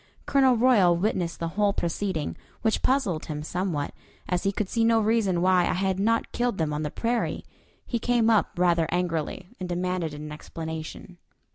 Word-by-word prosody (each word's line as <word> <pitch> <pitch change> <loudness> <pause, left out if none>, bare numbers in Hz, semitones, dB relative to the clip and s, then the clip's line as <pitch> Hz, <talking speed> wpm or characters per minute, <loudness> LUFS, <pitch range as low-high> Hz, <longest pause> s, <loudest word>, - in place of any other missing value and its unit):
Colonel 265 -3 +4
Royal 215 -8 +5
witnessed 175 -3 -1
the 165 - -2
whole 205 +3 +1
proceeding, 170 -2 -2 0.3
which 220 -1 +1
puzzled 250 - +1
him 150 -2 -4
somewhat, 170 -3 -2 0.3
as 180 -1 0
he 195 - +1
could 200 0 -2
see 230 +4 0
no 225 0 +4
reason 210 -5 +2
why 185 -1 +5
I - - +1
had 190 0 0
not 225 +3 +1
killed 245 -4 -1
them 155 -2 0
on 150 - -2
the 150 - -2
prairie. 235 +8 -1 0.4
He 235 - -2
came 240 -1 +2
up 220 -2 +4
rather 170 -2 +3
angrily, 175 0 -2
and 180 -1 -5
demanded 175 -3 -2
an 150 +1 -7
explanation. 160 +3 -7
185 Hz, 175 wpm, -26 LUFS, 165-220 Hz, 0.4 s, Royal